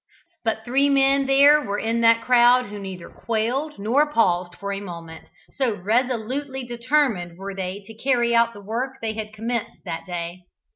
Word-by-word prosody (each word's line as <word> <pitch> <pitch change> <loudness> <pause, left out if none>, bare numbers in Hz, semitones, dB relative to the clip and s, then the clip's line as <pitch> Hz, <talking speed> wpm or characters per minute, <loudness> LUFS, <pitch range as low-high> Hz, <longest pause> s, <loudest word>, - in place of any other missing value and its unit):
But 220 -1 -2
three 270 +3 +2
men 275 0 +3
there 285 +2 +6
were 200 -5 -3
in 230 +2 -1
that 230 0 +4
crowd 250 0 +5
who 205 0 -8
neither 190 -3 -7
quailed 245 +7 -2
nor 260 +9 +1
paused 180 -8 +1
for 200 0 -5
a 195 - -4
moment, 170 -4 -9 0.3
so 255 -6 -1
resolutely 250 +6 -1
determined 240 - 0
were 195 +1 -6
they 190 +1 -5
to 225 - -11
carry 240 0 +1
out 235 0 +3
the 205 - -11
work 245 +5 -3
they 220 -1 -3
had 215 -1 -6
commenced 225 +1 -4
that 170 +1 -5
day. 175 0 -6
230 Hz, 175 wpm, -23 LUFS, 200-255 Hz, 0.3 s, there